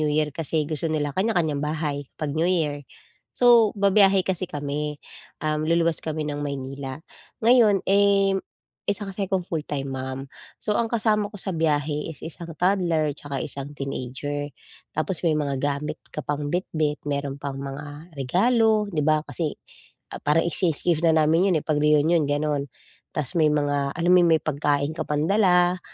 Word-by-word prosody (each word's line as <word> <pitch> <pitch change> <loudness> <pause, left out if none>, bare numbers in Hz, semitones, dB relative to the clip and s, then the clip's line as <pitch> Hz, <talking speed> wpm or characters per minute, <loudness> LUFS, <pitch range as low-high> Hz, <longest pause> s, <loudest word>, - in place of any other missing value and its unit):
New 155 - +1
Year 150 0 +1
kasi 155 0 -1
gusto 155 0 -1
nila 145 -2 -1
kanya-kanyang 175 -8 +1
bahay 150 -2 -2
'pag 150 -2 -3
New 165 +3 +1
Year. 150 -6 0 0.5
So, 235 -3 +6
babiyahe 195 -1 +4
kasi 185 -1 -1
kami, 145 +1 -3 0.5
um, 155 0 0
luluwas 170 0 +2
kami 155 -1 -2
ng 145 0 -3
Maynila. 135 0 -5 0.4
Ngayon, 225 -5 +5
eh, 200 0 +4 0.5
isa 205 0 -1
kasi 195 0 -3
akong 190 -1 0
full 160 -3 -2
time 140 -2 -3
mom. 130 0 -4 0.4
So 210 - 0
ang 235 - +2
kasama 215 -2 +1
ko - - -24
sa 195 - -1
biyahe 150 -1 0
is 150 - -11
isang 165 0 -8
toddler 175 -5 +2
tsaka 140 -2 -4
isang 140 +1 -6
teenager. 140 +2 -4 0.4
Tapos 160 +3 -1
may 155 - +3
mga 140 -3 -1
gamit 145 +1 -2 0.2
ka 150 - -3
pang 145 0 -3
bitbit, 155 -4 -1
meron 140 -1 -2
pang 140 -1 -5
mga 145 +4 -8
regalo, 215 - +2
'di 155 -4 -1
ba. 155 0 +3
Kasi 160 -4 -3 0.6
ah, - - -6
parang 150 +3 +3
exchange 170 -3 0
gift 170 -2 +2
na 160 - +5
namin 165 +5 +3
yun, - - +3
eh, - - -14
'pag 155 -2 +1
reunion 150 +2 +4
gano'n. 145 -1 -1 0.4
Ta's 150 +3 -3
may 160 -3 +4
mga 145 -1 0
alam 175 +1 +1
mo - - +7
yun, 170 - +4
may - - -25
pagkain 145 0 0
ka 160 - -1
pang 150 0 0
dala, 180 -3 +3
155 Hz, 175 wpm, -24 LUFS, 145-180 Hz, 0.6 s, mo